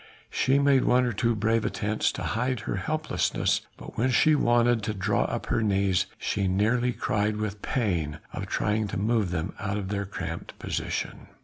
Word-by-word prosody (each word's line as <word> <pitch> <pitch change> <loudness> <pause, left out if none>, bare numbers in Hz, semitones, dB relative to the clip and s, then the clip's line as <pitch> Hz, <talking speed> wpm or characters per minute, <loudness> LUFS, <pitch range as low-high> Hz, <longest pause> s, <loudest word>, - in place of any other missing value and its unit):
She 135 +2 +2
made 140 -2 +4
one 125 +1 +4
or 120 - -1
two 115 +3 +1
brave 110 +1 +1
attempts 105 +1 0
to - - -5
hide 125 0 -1
her 100 - -3
helplessness, 155 +10 0 0.2
but - - -9
when 125 +3 +3
she 155 +4 +4
wanted 120 -4 +3
to 105 +1 -3
draw 100 +2 +1
up - - -3
her - - 0
knees, 95 -3 +2
she 100 -2 -1
nearly 110 +6 +2
cried 105 -2 0
with 105 -1 -3
the - - -7
pain 85 - 0 0.2
of - - -4
trying 105 +1 0
to - - -4
move 105 -1 +1
them 85 0 -2
out 100 0 -2
of 95 -2 -4
their 100 -1 -2
cramped 100 - -6
position. - - -3
105 Hz, 190 wpm, -27 LUFS, 100-120 Hz, 0.2 s, made